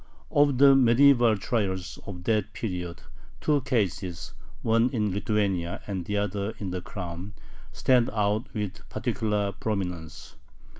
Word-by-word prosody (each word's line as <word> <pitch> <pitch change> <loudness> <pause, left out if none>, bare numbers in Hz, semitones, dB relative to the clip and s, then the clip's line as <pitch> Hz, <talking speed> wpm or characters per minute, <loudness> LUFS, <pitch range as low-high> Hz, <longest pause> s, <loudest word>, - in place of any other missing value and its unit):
Of 145 -2 +4
the 140 0 +7
medieval 120 -2 +5
trials 95 -4 -2
of 90 -4 -7
that 110 0 0
period 90 -6 -5 0.4
two 150 -2 +2
cases, 100 - -2 0.3
one 115 +2 +3
in 105 -6 -1
Lithuania 100 -4 -1
and 95 -4 -4
the 105 +2 -1
other 100 +1 -2
in 95 -3 -4
the 90 0 -3
Crown, 90 +1 -7 0.4
stand 125 -2 +3
out 105 +2 0
with 105 -2 -4
particular 105 -4 -1
prominence. 90 -7 -4
105 Hz, 130 wpm, -27 LUFS, 95-115 Hz, 0.4 s, the